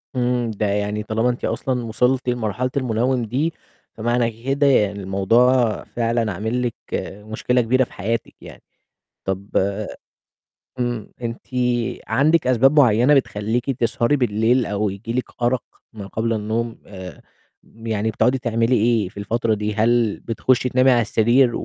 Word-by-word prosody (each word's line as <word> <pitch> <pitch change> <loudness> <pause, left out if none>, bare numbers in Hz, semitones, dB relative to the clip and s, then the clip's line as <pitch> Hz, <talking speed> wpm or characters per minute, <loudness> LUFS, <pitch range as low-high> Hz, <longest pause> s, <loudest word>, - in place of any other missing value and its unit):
إمم. 125 -2 0
ده 105 0 -2
يعني 105 +1 -1
طالما 110 +3 0
أنتِ 125 - -2
أصلًا 125 -2 -2
وصِلتِ 125 +3 +1
لمرحلة 120 +1 -1
المنَوّم 125 0 0
دي، 145 +9 -1 0.4
فمعنى 115 0 -1
كده 140 +2 +2
يعني 105 -6 +3
الموضوع 115 +5 +2
فعلًا 115 -2 -1
عامل 110 +7 -2
لِك 115 - -5 0.5
مشكلة 125 +3 0
كبيرة 130 +3 +2
في - - -9
حياتِك 115 +2 -3
يعني، - - -12 0.6
طَب 95 +1 -3 1.3
إمم. 120 -3 -3
أنتِ 115 -1 -5 0.6
عندِك 155 +1 +3
أسباب 135 +4 +4
معيّنة 125 +1 +5
بتخلّيكِ 120 -1 0
تسهري 120 +2 +1
بالليل، 120 0 +2
أو 105 0 -1
ييجي 100 +4 -6
لِك 125 +1 -1 0.2
أَرَق 120 +1 +1 0.3
ما 105 -3 -8
قبل 115 +3 -1
النوم، 110 +2 -2
آآ، 95 -2 -10 0.4
يعني 110 -1 -3
بتقعدي 125 +5 +2
تعملي 115 0 +1
إيه 110 -4 +2
في - - -18
الفترة 115 +2 0
دي، 105 0 -2
هل 115 0 +2
بتخُشّي 125 +3 0
تنامي 130 +1 +4
على 120 -1 +4
السرير 120 +3 +3
115 Hz, 140 wpm, -21 LUFS, 110-125 Hz, 1.3 s, معيّنة